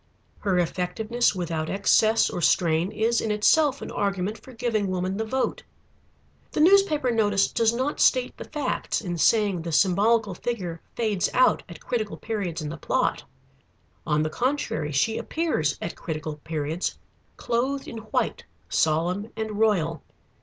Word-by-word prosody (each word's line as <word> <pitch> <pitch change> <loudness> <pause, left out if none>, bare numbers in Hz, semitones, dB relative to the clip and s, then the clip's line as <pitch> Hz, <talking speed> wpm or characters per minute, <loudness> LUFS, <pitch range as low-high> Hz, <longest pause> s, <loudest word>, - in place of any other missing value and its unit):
Her 195 -3 0
effectiveness 195 +7 0
without 165 -3 -3
excess 220 +3 +3
or 175 - -4
strain 165 +2 +2
is 225 +2 +1
in 220 - -2
itself 275 +7 +3
an - - -6
argument 200 +1 -2
for 260 - -14
giving 230 -4 -1
woman 185 0 -2
the 220 - -1
vote. 260 +4 -1 0.9
The - - -1
newspaper 320 -6 +4
notice 205 -3 +2
does 230 -2 +3
not 260 +5 -2
state 255 -1 +3
the - - -8
facts 300 -2 -2
in 175 -5 -4
saying 205 -2 +3
the 165 +1 -5
symbolical 205 +5 +3
figure 180 -5 -4
"fades 215 -6 0
out" 255 - +4
at 170 - -10
critical 220 -4 -2
periods 190 -8 -3
in 150 - -4
the 165 - -6
plot. - - 0 0.8
On 150 0 +2
the 155 - -2
contrary, 245 - -1
she 185 +11 +1
appears 310 - -1
at 170 - -5
critical 155 -1 -5
periods, 155 +2 -3 0.4
clothed 260 +4 -1
in 230 - -7
white, 220 0 -2 0.3
solemn 175 +7 +1
and 220 -1 -3
royal. 165 -8 +1
205 Hz, 150 wpm, -25 LUFS, 170-235 Hz, 0.9 s, newspaper